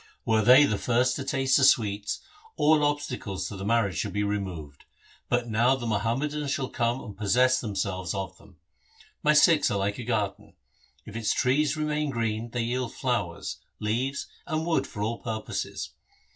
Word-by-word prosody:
Were 110 Hz, -1 st, +3 dB
they 125 Hz, +6 st, +8 dB
the 105 Hz, -8 st, +1 dB
first 125 Hz, +1 st, +2 dB
to 140 Hz, -, -4 dB
taste 135 Hz, -1 st, +2 dB
the 140 Hz, -, +2 dB
sweets, 105 Hz, -4 st, +2 dB, 0.4 s
all 150 Hz, 0 st, +4 dB
obstacles 145 Hz, -9 st, -2 dB
to 105 Hz, -, -7 dB
the 95 Hz, -, -6 dB
marriage 100 Hz, -6 st, +1 dB
should -, -, -2 dB
be 105 Hz, 0 st, 0 dB
removed, 90 Hz, -8 st, -4 dB, 0.4 s
but 120 Hz, 0 st, +1 dB
now 120 Hz, +4 st, +3 dB
the 125 Hz, -3 st, -6 dB
Muhammadans 135 Hz, +8 st, -1 dB
shall 135 Hz, -1 st, -1 dB
come 120 Hz, +2 st, -1 dB
and 105 Hz, -, -9 dB
possess 125 Hz, +5 st, +3 dB
themse 105 Hz, -4 st, -1 dB
ves 95 Hz, -1 st, -4 dB
of 95 Hz, -2 st, -4 dB
them. 100 Hz, -4 st, -19 dB, 0.6 s
My 150 Hz, -, +4 dB
Sikhs 155 Hz, +1 st, +5 dB
are 100 Hz, -, 0 dB
like 100 Hz, +2 st, -1 dB
a -, -, -4 dB
garden. 110 Hz, -4 st, -2 dB, 0.5 s
If -, -, -10 dB
its 115 Hz, -1 st, 0 dB
trees 140 Hz, +4 st, +2 dB
remain 150 Hz, -1 st, -1 dB
green 115 Hz, -2 st, -2 dB
they 120 Hz, 0 st, -2 dB
yield 125 Hz, +1 st, -2 dB
flowers, 100 Hz, -10 st, -2 dB, 0.2 s
leaves, 125 Hz, +6 st, -1 dB, 0.2 s
and 160 Hz, -1 st, -1 dB
wood 170 Hz, -1 st, +1 dB
for 105 Hz, -, -5 dB
all 115 Hz, +2 st, -2 dB
purposes. 110 Hz, -2 st, -4 dB
115 Hz, 175 wpm, -27 LUFS, 105-135 Hz, 0.6 s, they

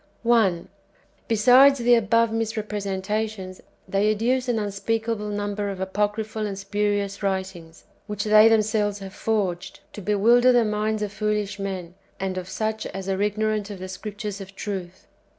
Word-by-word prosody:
1. 220 Hz, -8 st, +2 dB, 0.6 s
Besides 250 Hz, +5 st, +6 dB
the 245 Hz, -1 st, +3 dB
above 230 Hz, 0 st, +3 dB
[misrepresentations], 210 Hz, -2 st, -3 dB, 0.3 s
they 200 Hz, +2 st, +1 dB
adduce 250 Hz, +4 st, 0 dB
an 240 Hz, -2 st, +1 dB
unspeakable 215 Hz, +1 st, -2 dB
number 205 Hz, 0 st, -2 dB
of 195 Hz, -2 st, -5 dB
apocryphal 210 Hz, +3 st, -2 dB
and 195 Hz, -1 st, -5 dB
spurious 205 Hz, 0 st, -1 dB
writings, 190 Hz, -4 st, -4 dB, 0.3 s
wdiich 205 Hz, -1 st, -2 dB
they 215 Hz, +1 st, +7 dB
themselves 215 Hz, -2 st, +2 dB
have 195 Hz, -1 st, -9 dB
forged, 195 Hz, -5 st, -2 dB
to 210 Hz, -, -8 dB
bewilder 230 Hz, +6 st, +4 dB
the 240 Hz, -2 st, +4 dB
minds 215 Hz, 0 st, -1 dB
of 205 Hz, -1 st, -4 dB
foolish 210 Hz, -1 st, -2 dB
men, 185 Hz, -3 st, -5 dB, 0.3 s
and 190 Hz, -1 st, -2 dB
of 180 Hz, 0 st, -9 dB
such 220 Hz, +2 st, -2 dB
as 195 Hz, 0 st, -7 dB
are 195 Hz, 0 st, -1 dB
ignorant 215 Hz, 0 st, 0 dB
of 205 Hz, -, -6 dB
the 185 Hz, 0 st, -7 dB
Scriptures 205 Hz, +1 st, -6 dB
of 195 Hz, 0 st, -11 dB
truth. 190 Hz, -3 st, -6 dB
210 Hz, 150 wpm, -24 LUFS, 195-220 Hz, 0.6 s, they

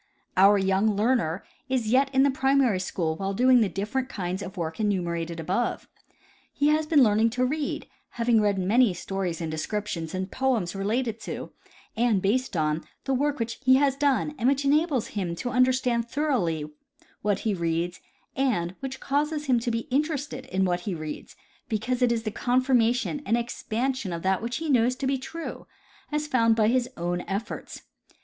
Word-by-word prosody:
Our 195 Hz, +2 st, +6 dB
young 195 Hz, +2 st, +2 dB
learner 210 Hz, -6 st, +1 dB, 0.3 s
is 250 Hz, -4 st, 0 dB
yet 265 Hz, +3 st, +4 dB
in 265 Hz, 0 st, +4 dB
the 280 Hz, -, +4 dB
primary 265 Hz, -6 st, +2 dB
school 165 Hz, -3 st, -2 dB
while 195 Hz, +3 st, -3 dB
doing 250 Hz, +2 st, +5 dB
the 210 Hz, -, +2 dB
difterent 215 Hz, +8 st, -2 dB
kinds 185 Hz, 0 st, -3 dB
of 195 Hz, 0 st, -7 dB
work 160 Hz, +1 st, -4 dB
enumerated 170 Hz, -5 st, -1 dB
above. 190 Hz, +9 st, -1 dB, 0.6 s
He 290 Hz, +1 st, +2 dB
has 305 Hz, 0 st, +2 dB
been 300 Hz, -4 st, +5 dB
learning 220 Hz, 0 st, +4 dB
to 255 Hz, -, +3 dB
read, 290 Hz, +3 st, -2 dB, 0.3 s
having 230 Hz, -2 st, +3 dB
read 205 Hz, -1 st, +2 dB
many 205 Hz, +2 st, +3 dB
stories 185 Hz, -2 st, -3 dB
and 160 Hz, -1 st, -3 dB
descriptions 165 Hz, 0 st, -3 dB
and 185 Hz, +1 st, -3 dB
poems 245 Hz, -10 st, 0 dB
relating 220 Hz, +3 st, -1 dB
to, -, -, -6 dB, 0.4 s
and 230 Hz, -3 st, +2 dB
based 210 Hz, +2 st, 0 dB
on, 155 Hz, +1 st, 0 dB, 0.2 s
the 270 Hz, -, -1 dB
work 290 Hz, +2 st, +1 dB
which 230 Hz, 0 st, -3 dB
he 260 Hz, 0 st, +6 dB
has 275 Hz, 0 st, +3 dB
done 285 Hz, +1 st, +1 dB
and 245 Hz, +2 st, +3 dB
which 280 Hz, 0 st, 0 dB
enables 290 Hz, -3 st, +2 dB
him 185 Hz, -5 st, -3 dB
to 245 Hz, +8 st, -4 dB
understand 250 Hz, -2 st, +2 dB
thoroughly 235 Hz, -, 0 dB, 0.6 s
what 205 Hz, -1 st, 0 dB
he 220 Hz, -, 0 dB
reads, 170 Hz, 0 st, -1 dB, 0.4 s
and 210 Hz, -11 st, 0 dB
which 265 Hz, -1 st, -5 dB
causes 295 Hz, +2 st, -1 dB
him 255 Hz, -4 st, +3 dB
to 240 Hz, +1 st, -2 dB
be 230 Hz, 0 st, -2 dB
interested 285 Hz, -2 st, -1 dB
in 190 Hz, -6 st, +1 dB
what 175 Hz, -1 st, 0 dB
he 185 Hz, 0 st, -4 dB
reads, 155 Hz, -2 st, -7 dB, 0.3 s
because 240 Hz, +3 st, -1 dB
it 245 Hz, -1 st, +4 dB
is 230 Hz, -1 st, 0 dB
the 215 Hz, -, -2 dB
confirmation 250 Hz, +2 st, +1 dB
and 230 Hz, -, +1 dB
expansion 240 Hz, -1 st, -2 dB
of 170 Hz, -1 st, -4 dB
that 190 Hz, 0 st, +1 dB
which 235 Hz, +2 st, -3 dB
he 320 Hz, -, -4 dB
knoAvs 250 Hz, 0 st, +3 dB
to 275 Hz, -, -3 dB
be 270 Hz, 0 st, 0 dB
true, 330 Hz, +5 st, -7 dB, 0.4 s
as 300 Hz, 0 st, -1 dB
found 230 Hz, -6 st, +3 dB
by 215 Hz, -1 st, +3 dB
his 250 Hz, 0 st, +1 dB
own 175 Hz, +1 st, -2 dB
efforts. 200 Hz, +4 st, -5 dB
230 Hz, 180 wpm, -26 LUFS, 190-260 Hz, 0.6 s, Our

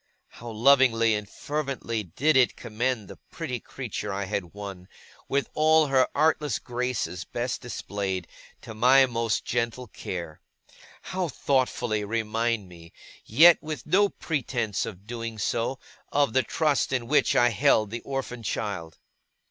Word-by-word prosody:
How 120 Hz, -, -10 dB
lovingly 115 Hz, -1 st, +4 dB
and 105 Hz, -1 st, -3 dB
fervently 135 Hz, -6 st, -3 dB
did 125 Hz, -, +1 dB
it 130 Hz, -2 st, +4 dB
commend 115 Hz, -1 st, -2 dB
the -, -, -11 dB
pretty -, -, -4 dB
creature -, -, -5 dB
I 100 Hz, +1 st, -2 dB
had 95 Hz, -3 st, -3 dB
won, 100 Hz, -3 st, -8 dB, 0.4 s
with 140 Hz, 0 st, +1 dB
all 155 Hz, 0 st, +4 dB
her 135 Hz, -2 st, +3 dB
artless 150 Hz, 0 st, +2 dB
graces 125 Hz, -7 st, -3 dB
best 120 Hz, +1 st, -3 dB
displayed, 100 Hz, -7 st, -4 dB, 0.3 s
to -, -, -9 dB
my 130 Hz, +5 st, +6 dB
most 115 Hz, -3 st, -1 dB
gentle 120 Hz, +1 st, -1 dB
care! 85 Hz, -7 st, -7 dB, 0.6 s
How 185 Hz, -1 st, -2 dB
thoughtfully 125 Hz, -6 st, 0 dB
remind 115 Hz, 0 st, -1 dB
me, 85 Hz, -1 st, -14 dB, 0.3 s
yet 160 Hz, +9 st, +7 dB
with 155 Hz, -1 st, -6 dB
no 200 Hz, +6 st, +4 dB
pretence 120 Hz, -, -2 dB
of 100 Hz, -2 st, -9 dB
doing 115 Hz, -1 st, -5 dB
so, 115 Hz, +4 st, -1 dB, 0.3 s
of 140 Hz, -5 st, +2 dB
the 130 Hz, -, +4 dB
trust 150 Hz, -1 st, 0 dB
in 125 Hz, -3 st, 0 dB
which 150 Hz, +5 st, +3 dB
I 120 Hz, -, +5 dB
held 105 Hz, 0 st, +3 dB
the 120 Hz, +1 st, -4 dB
orphan 135 Hz, -3 st, -4 dB
child! 100 Hz, -7 st, -4 dB
120 Hz, 140 wpm, -26 LUFS, 105-135 Hz, 0.6 s, yet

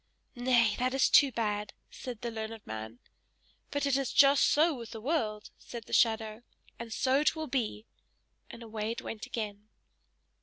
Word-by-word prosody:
"Nay, 240 Hz, -4 st, +3 dB
that 255 Hz, +1 st, 0 dB
is 270 Hz, -, +3 dB
too 280 Hz, -2 st, +7 dB
bad!" 210 Hz, -3 st, -2 dB, 0.2 s
said 245 Hz, -4 st, -7 dB
the 235 Hz, -, -3 dB
learned 220 Hz, -1 st, -6 dB
man. 110 Hz, +1 st, -7 dB, 0.7 s
"But 285 Hz, 0 st, -1 dB
it 280 Hz, -2 st, +2 dB
is 275 Hz, -1 st, 0 dB
just 280 Hz, 0 st, +6 dB
so 320 Hz, +3 st, +4 dB
with 235 Hz, -5 st, -8 dB
the 225 Hz, -, -7 dB
world!" 220 Hz, -5 st, -2 dB
said 235 Hz, -2 st, -8 dB
the -, -, -12 dB
shadow, 220 Hz, -1 st, +2 dB, 0.4 s
"and 235 Hz, -1 st, -7 dB
so 260 Hz, +4 st, +2 dB
it 300 Hz, -, +2 dB
will 315 Hz, 0 st, -3 dB
be!" 235 Hz, -6 st, -2 dB, 0.6 s
and 235 Hz, -, -10 dB
away 220 Hz, -1 st, -4 dB
it 230 Hz, -, -4 dB
went 225 Hz, +2 st, -6 dB
again. 210 Hz, -4 st, -5 dB
230 Hz, 175 wpm, -30 LUFS, 215-265 Hz, 0.7 s, too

